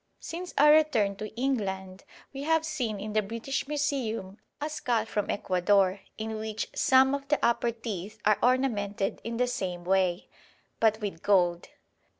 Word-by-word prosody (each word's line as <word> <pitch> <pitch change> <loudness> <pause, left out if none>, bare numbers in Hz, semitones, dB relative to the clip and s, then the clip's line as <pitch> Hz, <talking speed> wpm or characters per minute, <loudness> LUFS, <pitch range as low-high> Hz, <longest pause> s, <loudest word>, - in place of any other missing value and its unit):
Since 350 +2 -7
our 295 +1 +7
return 270 -11 +3
to 215 +1 -5
England 190 -8 -2 0.3
we 270 - -6
have 320 +2 +2
seen 245 -10 -2
in 210 +1 -5
the 215 - +3
British 230 +7 -4
Museum 255 -9 -2 0.2
a 295 - -2
skull 240 -7 -1
from 210 -2 -2
Ecuador, 190 0 +2 0.2
in 220 0 -4
which 220 0 -4
some 265 +1 +4
of 280 0 -3
the 295 0 +2
upper 235 0 +2
teeth 220 -3 -6
are 210 0 +4
ornamented 215 -6 0
in 230 0 -4
the 250 - +3
same 185 -8 -3
way, 185 -1 +1 0.5
but 220 -1 +3
with 195 -6 -4
gold. 175 -4 +2
220 Hz, 155 wpm, -28 LUFS, 195-265 Hz, 0.5 s, our